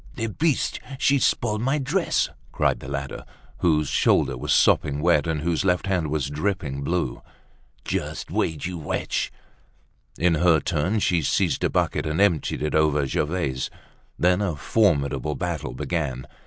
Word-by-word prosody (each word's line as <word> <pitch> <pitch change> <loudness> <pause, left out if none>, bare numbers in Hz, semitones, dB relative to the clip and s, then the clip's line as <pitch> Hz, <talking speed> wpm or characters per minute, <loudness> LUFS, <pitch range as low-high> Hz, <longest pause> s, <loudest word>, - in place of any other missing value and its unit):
"The 115 - -2
beast! 150 +5 0 0.2
She's 135 -1 +3
spoilt 110 -2 +1
my 135 +5 +1
dress!" 150 - 0 0.2
cried - - +1
the - - -10
latter, 70 -1 -4 0.4
whose 75 -4 +2
shoulder - - +2
was 60 - -3
sopping 70 0 +3
wet 85 0 +3
and 80 -2 -1
whose 85 0 0
left 90 -1 +1
hand 90 -5 0
was 75 -3 -1
dripping 75 -2 -2
blue. 85 +5 -2 0.6
"Just - - -3
wait, 80 -3 -1
you 90 -1 -4
wretch!" 75 - -2 0.9
In 90 0 +3
her 80 0 +4
turn 85 +8 0
she 85 -4 +2
seized 70 - +1
a - - +3
bucket, - - 0
and 80 +2 -1
emptied 90 -8 +2
it 75 - -1
over 75 -2 +3
Gervaise. 70 -2 -1 0.5
Then 90 +2 +3
a 95 -6 -1
formidable 70 - +1
battle - - -3
began. 65 -4 -3
80 Hz, 155 wpm, -24 LUFS, 75-95 Hz, 0.9 s, her